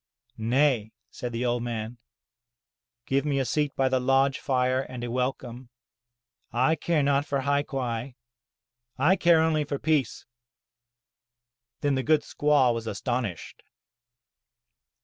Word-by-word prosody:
'* 120 - -42
"Nay," 120 -1 +1 0.2
said 125 - -6
the 120 +1 -2
old 120 0 0
man. 115 0 -5 1.1
'*Give 135 0 +1
me 145 -2 0
a 135 - +1
seat 150 +1 -1
by 135 - +2
the 130 0 +1
lodge 135 +1 +2
fire 130 -1 +1
and 125 -2 -7
a 120 - -4
welcome. 125 -1 -3 0.8
I 130 +6 +2
care 160 -1 0
not 140 0 +2
for 140 -2 -2
hai 140 +1 +1
quai, 125 -3 -4 0.8
I 160 +8 +4
care 170 -3 +4
only 155 -2 +1
for 145 -1 -3
peace!" 150 -1 0 1.6
Then 145 -1 +1
the 130 - 0
good 150 +4 +3
squaw 145 -4 +2
was 115 -1 -5
astonished. 110 - -4
130 Hz, 135 wpm, -26 LUFS, 120-145 Hz, 1.6 s, I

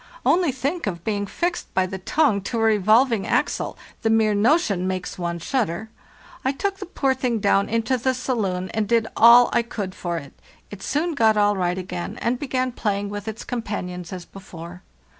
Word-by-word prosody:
Only 350 -4 +3
think 275 +4 -2
of 170 -4 -4
being 205 -2 -1
fixed 345 - -2
by 185 - +3
the 190 +1 -6
tongue 225 0 +2
to 235 - -2
a 225 - +1
revolving 220 +1 +3
axle—the 225 - -2
mere 220 -1 +3
notion 205 - +2
makes 185 0 -4
one 170 -1 -2
shudder! 220 - -2 0.5
I 265 - +1
took 395 +7 -2
the 390 - -6
poor 270 -6 +1
thing 255 -3 -1
down 200 -1 +2
into 230 +3 0
the 260 +2 +1
saloon 200 -8 -2
and 220 -2 0
did 230 0 +3
all 235 +2 +7
I - - +4
could 205 -5 -5
for 175 -2 -3
it. 140 -3 -8 0.4
It 205 -2 -9
soon 320 +4 -1
got 220 -5 +3
all 205 0 +3
right 180 -1 0
again, 180 -1 -5
and 240 +1 0
began 255 -2 -1
playing 205 -4 -2
with 205 +1 -6
its 220 0 -5
companions 180 -7 -5
as 180 -2 -6
before. 180 -2 -11
215 Hz, 185 wpm, -23 LUFS, 185-255 Hz, 0.5 s, all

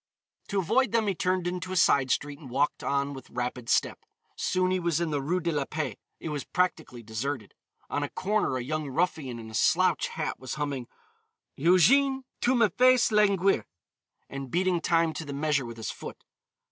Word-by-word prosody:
To 200 - -2
avoid 225 +6 +2
them 230 -2 +3
he 200 - +1
turned 185 0 0
into 180 +1 -3
a - - -2
side 140 -6 +4
street 145 +2 -1
and 140 - -11
walked 140 +4 0
on 140 0 0
with 135 - -10
rapid 125 -1 -4
step. - - +2 0.4
Soon 185 0 0
he 185 - +1
was 170 -2 0
in 170 -2 -1
the 145 -2 0
Rue 170 +7 0
de 170 -1 -1
la 145 -3 -1
Paix. 150 -8 -3 0.2
It - - -5
was 145 -2 -3
practically 160 -9 -1
deserted. 115 +1 -4 0.3
On 145 - -2
a 145 - -2
corner, 205 -8 0
a 125 - -3
young 155 +2 -3
ruffian 150 -5 -1
in 110 -1 -9
a - - -13
slouch - - +3
hat - - -4
was 130 - -5
humming, 140 -5 -3 0.7
"Ugène, 265 - +4 0.2
tu 255 +2 +3
m'fais 250 +2 +4
languir," 195 - +3 0.6
and 135 -1 -6
beating 180 +2 +1
time 165 -1 +2
to 160 - -5
the 145 -2 -6
measure 145 -2 0
with 115 0 -8
his 110 - -4
foot. - - -9
155 Hz, 190 wpm, -28 LUFS, 135-185 Hz, 0.7 s, side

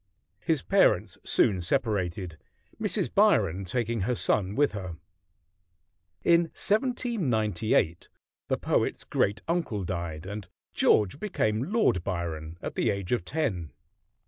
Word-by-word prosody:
His - - 0
parents - - +2
soon 95 -3 +3
separated, 90 - -1 0.4
Mrs. - - 0
Byron 95 +4 +3
taking 115 +3 -1
her 125 +6 0
son 100 -3 +1
with 145 0 +3
her. 95 -5 -6 1.3
In 170 0 +5
1798 125 - 0 0.4
the - - 0
poet's - - 0
great 105 +2 0
uncle 165 - -1
died, 85 -3 -4
and 100 0 -6 0.3
George 105 +6 +3
became 130 - -1
Lord 215 - +2
Byron 85 -3 -4
at - - -4
the 115 - +1
age 100 -3 -3
of 120 -7 +1
ten. 90 - -2
105 Hz, 120 wpm, -28 LUFS, 90-125 Hz, 1.3 s, In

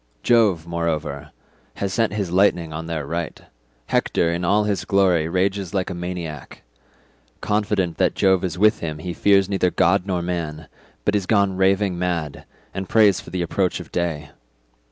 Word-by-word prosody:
Jove, 105 -9 +3
moreover, 80 -4 -3 0.5
has 100 -1 -3
sent 115 0 +1
his 100 -5 -2
lightnings 90 -4 +2
on 80 +1 -5
their 80 -4 -3
right; 85 +1 -4 0.5
Hector, 85 +6 +1
in 85 +1 -3
all 100 +4 +3
his 100 -4 -1
glory, 90 -4 +2
rages 95 0 -1
like 95 -1 -1
a - - -3
maniac; 85 -5 -6 0.8
confident 105 -4 -1
that - - +2
Jove 95 -1 +3
is 90 -2 -3
with 105 +3 +4
him 80 -2 -4
he 85 +3 -5
fears 100 0 +3
neither 95 -2 +1
god 90 +3 +2
nor 90 -3 -1
man, 80 -3 -4 0.4
but 105 - +2
is 100 -3 -1
gone 100 -3 +2
raving 95 -1 +1
mad, 85 -5 -3 0.3
and 95 -1 -5
prays 105 -4 +4
for - - -12
the 90 0 -2
approach 90 +2 -1
of - - -10
day. 75 -4 -3
90 Hz, 170 wpm, -22 LUFS, 85-100 Hz, 0.8 s, with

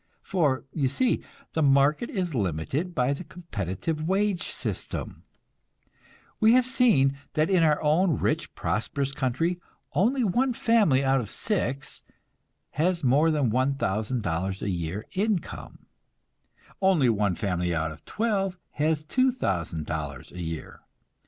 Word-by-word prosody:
For, 150 -9 +1
you 140 -4 +1
see, 240 - +1 0.3
the 160 - 0
market 140 +8 +3
is 180 -6 -2
limited 120 - -2
by 125 +2 +2
the 140 - -6
competitive 155 - -4
wage 195 0 +1
system. - - -5 1.1
We 220 0 +6
have 255 0 +5
seen 200 - +3
that 155 +4 +1
in 185 -3 +4
our 155 -2 +4
own 155 0 +3
rich, - - -1
prosperous 135 +5 -1
country 150 +6 -1 0.3
only 245 +7 +2
one 245 +6 +2
family 210 - +3
out 135 -1 +3
of 105 - -6
six 140 - -1 0.7
has 170 +2 0
more 140 +6 +4
than 145 -7 +1
$1,000 105 -7 -1
a - - -1
year 90 +4 -3
income; 200 -2 -3 1.0
only 185 -9 +4
one 105 -5 +2
family 90 -4 -1
out 80 0 -1
of 75 - -12
twelve 195 -4 -1
has 155 0 0
$2,000 85 - -1
a 90 - -7
year. 80 -1 -6
145 Hz, 125 wpm, -27 LUFS, -, 1.1 s, We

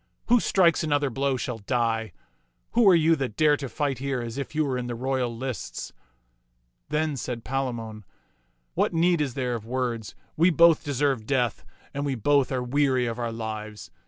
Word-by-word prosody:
" - - -47
Who 245 +1 +6
strikes 175 -6 +3
another 145 -3 +1
blow 135 +1 0
shall 125 -2 -4
die. 115 -1 -1 0.6
Who 230 -4 +5
are 185 - +7
you 165 0 +4
that 130 -6 -4
dare 150 -1 +5
to 140 -2 -5
fight 140 -4 -2
here 135 -1 -2
as 120 +2 -5
if 140 - -6
you 155 0 +2
were 135 -2 -1
in 125 -1 -3
the 120 - -4
royal 130 0 -1
lists? 130 -1 -5 0.5
" - - -46
Then 150 0 0
said 120 -2 -5
Palamon, 120 -5 -3 0.7
"What - - 0
need 170 0 +3
is 135 -5 -2
there 125 -2 -1
of 115 -3 -4
words? 120 -2 -3 0.2
We 170 +4 +4
both 170 -1 +5
deserve 135 -5 0
death, 125 -5 0 0.3
and 140 - -3
we 140 -2 -1
both 140 +4 +2
are 130 -1 -1
weary 130 -1 +1
of 115 0 -3
our 120 -1 -2
lives. 110 -2 -6
130 Hz, 190 wpm, -26 LUFS, 115-145 Hz, 0.7 s, are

